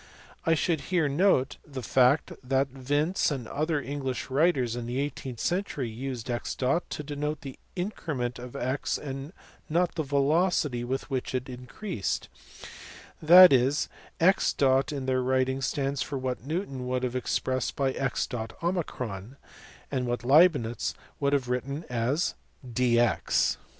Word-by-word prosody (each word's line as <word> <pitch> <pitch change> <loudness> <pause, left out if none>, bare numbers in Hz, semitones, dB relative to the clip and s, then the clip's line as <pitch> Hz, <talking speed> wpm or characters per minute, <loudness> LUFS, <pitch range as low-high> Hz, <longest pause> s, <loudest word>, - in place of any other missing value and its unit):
I 165 - +5
should 160 -1 0
here 175 -4 +2
note 145 -3 +2
the 135 -3 -7
fact 130 +5 +3
that 135 +1 +1
Vince 145 +7 0
and 135 -6 -4
other 155 +3 -1
English 135 -2 -4
writers 135 -5 +2
in 120 -1 -5
the 125 +2 -2
eighteenth 135 -4 -4
century 175 -8 -1
used 125 0 -5
x 120 -1 -3
to 150 +3 -1
denote 150 +1 -3
the 135 -2 -9 0.2
increment 155 - -3
of 125 0 -9
x 130 +3 -1
and 135 +1 -6 0.4
not 175 +3 +1
the 165 - -1
velocity 145 -2 +1
with 130 +3 -3
which 130 0 -2
it 130 +1 -2
increased; 125 - -4 0.9
that 175 +1 +9
is, 135 +3 +2 0.3
x 185 +4 +3 0.4
in 140 -3 -4
their 130 -1 +1
writings 130 +1 +1
stands 140 -1 -1
for 140 - -3
what 130 -2 -3
Newton 140 -4 -3
would 125 0 -1
have 125 0 -2
expressed 130 0 -1
by 135 -1 0
xo 125 - -3 0.6
and 130 -3 -1
what 120 0 -2
Leibnitz 135 - +4 0.2
would 140 0 +1
have 135 -3 +1
written 140 +5 -2
as 125 +8 0 0.3
dx. 120 -1 +2
135 Hz, 140 wpm, -28 LUFS, 125-150 Hz, 0.9 s, that